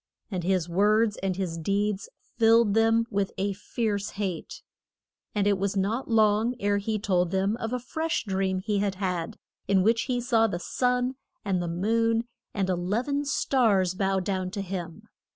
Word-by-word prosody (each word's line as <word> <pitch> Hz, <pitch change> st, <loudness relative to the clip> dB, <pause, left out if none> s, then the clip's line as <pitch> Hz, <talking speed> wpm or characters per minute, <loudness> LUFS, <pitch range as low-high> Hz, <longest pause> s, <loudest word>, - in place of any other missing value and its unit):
And 180 Hz, -3 st, -2 dB
his 180 Hz, -2 st, +1 dB
words 210 Hz, +4 st, +2 dB
and 190 Hz, -1 st, -2 dB
his 175 Hz, -3 st, -3 dB
deeds 200 Hz, +4 st, -1 dB, 0.3 s
filled 225 Hz, -2 st, +5 dB
them 225 Hz, +1 st, +3 dB
with 200 Hz, -1 st, 0 dB
a 200 Hz, +1 st, 0 dB
fierce 205 Hz, 0 st, -2 dB
hate. 190 Hz, -5 st, -5 dB, 0.7 s
And 205 Hz, -1 st, +1 dB
it 200 Hz, -2 st, +2 dB
was 200 Hz, +1 st, -1 dB
not 215 Hz, +8 st, -1 dB
long 220 Hz, +2 st, +3 dB
ere 205 Hz, -1 st, +1 dB
he 215 Hz, +2 st, -1 dB
told 180 Hz, -4 st, +1 dB
them 195 Hz, +3 st, +1 dB
of 225 Hz, -1 st, -4 dB
a 250 Hz, -, 0 dB
fresh 315 Hz, +6 st, -2 dB
dream 190 Hz, -1 st, -1 dB
he 205 Hz, 0 st, 0 dB
had 200 Hz, -1 st, 0 dB
had, 180 Hz, -3 st, -3 dB, 0.3 s
in 190 Hz, -2 st, +3 dB
which 230 Hz, +3 st, +2 dB
he 245 Hz, -1 st, +1 dB
saw 235 Hz, -2 st, +3 dB
the 195 Hz, -, -3 dB
sun 250 Hz, +6 st, 0 dB, 0.3 s
and 190 Hz, -3 st, +1 dB, 0.2 s
moon 230 Hz, +3 st, +2 dB, 0.3 s
and 195 Hz, -2 st, -1 dB
e 185 Hz, -, +1 dB
lev 200 Hz, +9 st, -1 dB
en 285 Hz, +1 st, 0 dB
stars 220 Hz, -10 st, +2 dB
bow 195 Hz, 0 st, 0 dB
down 185 Hz, -1 st, -2 dB
to 200 Hz, +1 st, -4 dB
him. 180 Hz, +1 st, -6 dB
200 Hz, 175 wpm, -27 LUFS, 190-225 Hz, 0.7 s, filled